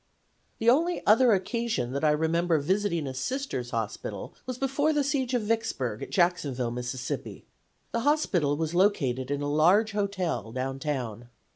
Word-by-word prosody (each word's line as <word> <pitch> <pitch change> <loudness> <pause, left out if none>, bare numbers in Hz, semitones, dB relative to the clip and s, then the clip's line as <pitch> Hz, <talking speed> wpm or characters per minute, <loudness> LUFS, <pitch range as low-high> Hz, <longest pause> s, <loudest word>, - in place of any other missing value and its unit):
"The 225 - -3
only 330 +9 +3
other 235 +3 +6
occasion 215 - 0
that 140 +2 -3
I 155 - +5
remember 160 +2 +2
visiting 170 +1 0
a 135 - -4
Sisters' 135 - -3
hospital 115 -3 -4
was 255 -1 -4
before 275 +4 +1
the 295 -1 +2
siege 265 -3 0
of 240 - 0
Vicksburg, 210 - -1
at - - -6
Jacksonville, 145 -9 +1
Miss. 125 0 -3 0.2
The - - -5 0.6
hospital 200 - +1
was 160 +1 -2
located 140 -10 +1
in 145 0 -1
a - - -1
large 190 +9 +4
hotel, 185 - -2
downtown. 130 -3 -3
170 Hz, 150 wpm, -27 LUFS, -, 0.6 s, other